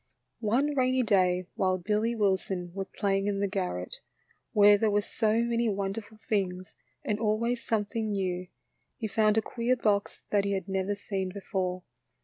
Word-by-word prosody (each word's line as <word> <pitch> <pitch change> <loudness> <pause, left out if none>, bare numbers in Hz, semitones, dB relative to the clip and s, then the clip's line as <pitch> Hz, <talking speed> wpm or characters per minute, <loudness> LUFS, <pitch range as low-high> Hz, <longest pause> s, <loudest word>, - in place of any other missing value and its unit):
Oxe 270 +8 +2
rainy 255 -1 +2
clay 185 -4 +2
while 185 -1 +1
Billy 215 +5 0
Wilson 190 -4 0
was 195 0 -4
play 195 -1 0
ing 195 - -2
in 200 -1 0
the 200 - +1
garret, 180 - -3 0.5
where 205 0 +7
there 215 +1 +2
were 205 0 +3
so 220 +2 +1
many 235 -1 +1
wonderful 200 +2 -3
things 185 -4 -1 0.3
and 210 0 0
always 230 +2 0
something 220 0 -1
new, 185 -3 -2 0.5
he 225 - -3
found 215 0 +2
a 220 - +3
queer 240 +3 0
box 205 -4 0
that 205 -1 +3
he 200 0 0
had 190 -1 -3
never 195 +1 -1
seen 195 -2 -3
before. 185 -2 -3
205 Hz, 165 wpm, -29 LUFS, 190-220 Hz, 0.5 s, where